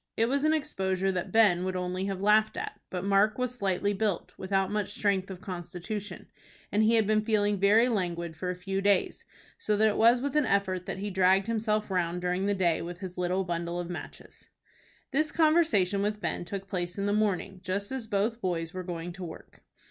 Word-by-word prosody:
It 225 - +3
was 280 +3 0
an 310 - +4
exposure 195 -12 0
that 180 -2 -3
Ben 205 -6 +4
would 185 0 -2
only 180 +1 -2
have 195 -1 -3
laughed 215 +1 +3
at, - - -5
but 180 0 -4
Mark 200 +2 +3
was 250 -1 -1
slightly 200 -3 0
built, 200 -3 -2
without 195 0 -1
much 205 -1 -1
strength 195 -2 +1
of 185 -1 -8
constitution, 185 +2 -6 0.5
and 210 - +2
he 220 +2 +4
had 220 -2 +3
been 215 +1 +2
feeling 205 -2 +1
very 210 +5 +5
languid 170 -7 -2
for 180 +3 -4
a 180 - -2
few 195 +2 -3
days, 200 -1 +1 0.3
so 210 -1 0
that 220 +1 +4
it 210 - -2
was 235 +2 +5
with 280 +2 -3
an 300 -3 +3
effort 190 -2 0
that - - -3
he 200 +1 -4
dragged 190 +1 +3
himself 215 -2 -1
round 175 -1 0
during 180 +2 -1
the 205 - +1
day 175 -4 +1
with 175 +1 -6
his 185 -1 -7
little 180 +2 0
bundle 170 -1 -3
of 175 0 -4
matches. 175 - -10 0.6
This 305 +2 +1
conversation 310 - +3
with 210 +1 -1
Ben 175 - -3
took 195 +1 -6
place 175 -1 -3
in 200 - -1
the 205 - +1
morning 200 -2 0
just 200 +3 -3
as 260 -4 -4
both 220 +3 0
boys 165 -3 -2
were 185 - -4
going 175 -1 -5
to 190 +1 -8
work. 165 -2 -10
195 Hz, 210 wpm, -29 LUFS, 180-215 Hz, 0.6 s, very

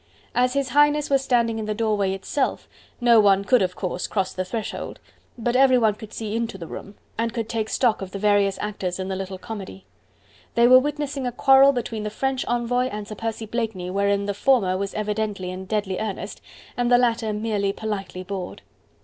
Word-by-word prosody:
As 250 +1 +2
His 280 -1 0
Highness 295 +2 +3
was 270 -1 +3
standing 235 -3 +1
in 220 - -3
the 215 0 -2
doorway 210 -3 +1
itself, 260 +8 -2 0.3
no 240 -2 +6
one 200 -2 +4
could 250 +1 +4
of 180 -1 0
course 180 -1 -3
cross 190 -2 -1
the 185 - -2
threshold, 210 +4 -5 0.4
but 240 +1 -1
everyone 255 -5 +5
could 215 0 -11
see 220 -1 -4
into 230 -3 -2
the 170 - -7
room, 200 +5 -9 0.2
and 230 0 0
could 230 -2 -3
take 225 -1 -2
stock 235 -6 +1
of 190 - -5
the 200 - -6
various 200 -1 +2
actors 195 -4 -3
in 190 0 -4
the 190 - -2
little 190 0 -5
comedy. 195 -2 -8 0.7
They 235 0 +5
were 255 +1 +9
witnessing 285 -1 -3
a - - -1
quarrel 270 +3 +6
between 235 -4 -3
the 210 - -3
French 265 +4 -1
envoy 240 +1 +1
and 210 -4 -6
Sir 215 - -6
Percy 225 +1 -4
Blakeney 215 -5 -3
wherein 200 +1 +1
the 205 - -1
former 205 -4 +2
was 195 +1 -3
evidently 210 -3 -2
in 185 +1 -7
deadly 200 -2 -2
earnest 205 -1 -5 0.3
and 245 0 0
the 245 - +7
latter 230 -2 +1
merely 210 -2 -1
politely 195 -3 -5
bored. 185 -1 -6
215 Hz, 200 wpm, -23 LUFS, 195-245 Hz, 0.7 s, were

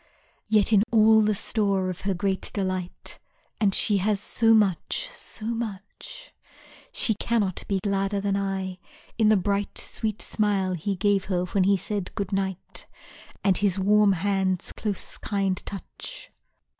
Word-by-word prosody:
Yet 215 0 +3
in 200 - +6
all 220 -1 +6
the 210 0 +2
store 200 -3 +1
of 185 - -9
her 190 - +1
great 190 +1 -1
delight 185 -3 -4 0.4
(And 200 -3 +3
she 205 -2 +4
has 200 +1 +1
so 225 +2 +2
much, 205 - +1
so 225 - -5
much) 225 - -6 0.6
She 220 - +2
cannot 210 -3 -1
be 195 -1 0
gladder 200 0 0
than 200 0 0
I, 190 -2 -3 0.4
in 215 -1 +5
the 215 - +5
bright 200 +1 -1
Sweet 215 -1 -3
smile 200 -3 0
he 185 +4 -2
gave 200 0 +1
her 180 -2 0
when 185 +1 +1
he 200 0 +4
said 200 -1 -4
good 200 -3 -3
night 190 -2 -3 0.6
And 195 -3 +3
his 200 -2 +1
warm 205 +1 +4
hand's 190 0 0
close, 210 -3 -5
kind 195 -3 -1
touch. 350 - -7
200 Hz, 150 wpm, -25 LUFS, 190-210 Hz, 0.6 s, in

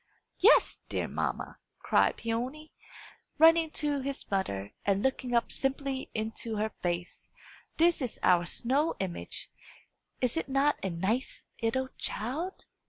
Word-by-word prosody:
"Yes, 425 +7 +5
dear - - -1
mamma," - - -3 0.2
cried - - +2
Peony, 255 +7 -3 0.7
running 325 +1 +6
to 295 -2 0
his 275 0 -4
mother 100 - -1
and 200 0 +1
looking 260 -2 0
up 235 - +2
simply 270 0 -2
into 220 +1 -2
her 215 +1 -1
face, 175 0 -3 0.5
"This 335 -1 +4
is 250 -4 -3
our 175 -1 +4
snow 275 - +1
image! 185 -3 -4 0.7
Is 250 +3 0
it 325 - -2
not 275 +2 +2
a 190 - 0
nice 190 +9 -1 0.2
'ittle 260 +3 0
child?" 300 - -3
255 Hz, 130 wpm, -30 LUFS, 210-290 Hz, 0.7 s, running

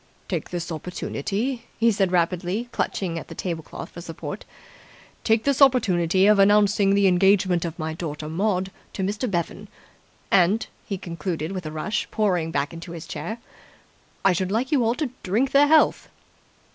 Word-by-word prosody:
"Take - - -3
this 175 -1 -4
opportunity," 195 - -3
he 230 0 +4
said 195 -3 +1
rapidly, 180 +6 0
clutching 170 -7 -2
at - - -10
the - - -9
table 170 -3 -3
cloth - - -9
for 175 - -9
support, 165 -1 -7 0.8
"take 225 0 +2
this 280 0 +1
opportunity 190 -9 +4
of 210 0 +5
announcing 200 0 +4
the 200 0 +3
engagement 185 -1 +3
of 165 -1 -5
my 160 -1 -3
daughter 155 -2 -5
Maud 190 +3 -1 0.2
to 190 - -3
Mr. 205 +6 -1
Bevan. 175 -3 -3 0.6
And," 195 +5 +4 0.2
he 200 - -3
concluded 165 -1 -4
with 185 -4 -5
a - - -5
rush, 160 +8 -2
pouring 180 -7 0
back 145 0 -2
into 165 +1 -8
his 165 -1 -7
chair, 220 - -5 0.9
"I 195 - +6
should 185 +2 -1
like 235 +5 0
you 275 -5 +3
all 230 +1 +1
to 295 -4 -2
drink 225 +9 0
their 285 +1 +6
health!" 315 +1 +4
190 Hz, 170 wpm, -24 LUFS, 170-215 Hz, 0.9 s, I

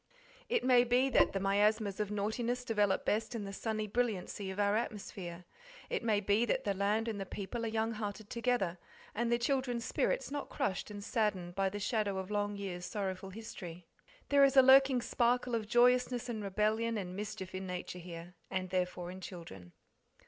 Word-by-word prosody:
It 475 -1 +1
may 250 -1 +6
be 250 +2 +2
that - - +5
the 195 - -1
miasmas 205 +1 +2
of 210 -1 -1
naughtiness 230 +4 -1
develop 210 -5 +1
best 220 +3 0
in 220 - -3
the 195 - -6
sunny 215 +1 -2
brilliancy 210 -3 -2
of 190 +2 -5
our 205 0 +3
atmosphere. 190 -6 -4 0.5
It - - 0
may 220 -3 +2
be 205 +3 +3
that 240 - 0
the 200 - 0
land 205 +4 +1
and 210 -3 -3
the - - -3
people 230 +5 -4
are - - -1
young 225 +1 0
hearted 215 -1 -5
together, 230 -7 0 0.3
and 235 +2 0
the 235 - +4
children's 245 -1 0
spirits - - 0
not 290 0 -4
crushed 190 +2 -2
and 205 -1 -7
saddened 205 -6 -1
by 195 +1 +1
the 205 +2 -5
shadow 205 -2 0
of 190 +1 -4
long 205 0 0
years' 185 -3 -5
sorrowful 190 -2 -3
history. 180 -5 -8 0.4
There 280 -1 +6
is 275 0 +4
a 265 - +10
lurking 265 -1 +6
sparkle 245 +1 +1
of 220 -2 -1
joyousness 245 +1 +3
and 220 -3 -3
rebellion 215 +3 0
and 185 -3 -4
mischief 205 -2 -5
in 190 0 -4
nature 180 0 -5
here, 170 0 -9 0.2
and 185 -1 -3
therefore 180 -1 -1
in 185 +1 -9
children. 160 - -9
210 Hz, 190 wpm, -33 LUFS, 190-235 Hz, 0.5 s, a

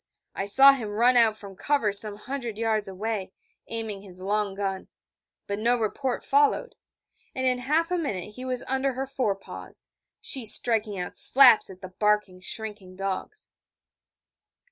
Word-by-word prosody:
I 195 - -4
saw 270 +6 +8
him 235 -6 -4
run 235 +4 +3
out 225 -3 +4
from 200 -2 -11
cover 275 -4 0
some 205 0 +2
hundred 240 -1 -6
yards 220 -2 0
away, 200 +1 -4 0.3
aiming 220 -3 -5
his 185 -2 -14
long 205 0 -1
gun: 195 -1 -4 0.6
but 200 +1 -4
no 240 +3 +2
report 240 +3 -3
followed: 435 +3 +2 0.6
and 260 - -2
in 250 -1 +1
half 310 +7 0
a 360 - +1
minute 210 - -4
he 255 - -9
was 255 -1 -2
under 265 +1 0
her 265 +2 -3
fore 255 -7 -1
paws, 195 - -12 0.3
she 265 -4 -5
striking 220 -1 +2
out 180 - -5
slaps 260 -4 +6
at 185 -1 -12
the 185 - -8
barking, 210 -1 0
shrinking 205 -3 -5
dogs. 195 - -5
220 Hz, 160 wpm, -26 LUFS, 200-255 Hz, 0.6 s, saw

